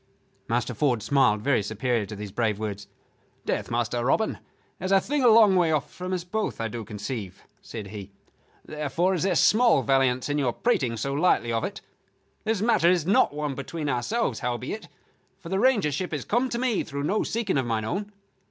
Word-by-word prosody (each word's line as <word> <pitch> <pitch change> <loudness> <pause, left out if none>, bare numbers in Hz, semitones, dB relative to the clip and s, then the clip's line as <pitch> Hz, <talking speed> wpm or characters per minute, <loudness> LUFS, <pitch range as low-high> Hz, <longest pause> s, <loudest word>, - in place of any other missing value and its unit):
Master 120 +1 -1
Ford 125 -4 +1
smiled 110 -4 +3
very 135 -4 +2
superior 110 +1 -1
to 105 - -7
these 105 -1 -7
brave 110 -1 0
words. 105 -2 -5 0.6
"Death, - - -2
Master 120 0 -1
Robin, 220 - +1 0.4
is 185 +1 -3
a 195 - +6
thing 280 +7 -1
a - - +6
long 220 -4 +7
way 175 -3 +3
off 150 -2 -1
from 180 +1 -6
us 180 -2 -1
both, 215 +4 -3
I 115 0 -2
do 115 +1 -5
conceive," 105 -1 -6 0.2
said 105 -4 -8
he. 100 -1 -8 0.5
"Therefore 155 +5 -1
is 175 - -1
there 185 -1 +1
small 235 +8 +4
valiance 130 -2 +2
in 145 0 0
your 125 -4 +1
prating 130 - 0
so 140 +5 -2
lightly 145 -6 +2
of 115 0 0
it. 200 - -4 0.6
This 215 -2 0
matter 220 -7 +4
is 175 -3 +2
one 190 - +2
not 150 -5 +1
between 150 +3 -4
ourselves, 130 - -1
howbeit, 125 - -4 0.5
for 165 - -10
the 190 - 0
Rangership 190 - +1
has 145 - -3
come 245 +4 +1
to 235 - -2
me 245 -4 0
through 140 -2 -5
no 200 +8 +1
seeking 220 -10 -1
of 130 - -2
mine 110 -2 -1
own. 200 - -3
145 Hz, 195 wpm, -26 LUFS, 115-190 Hz, 0.6 s, long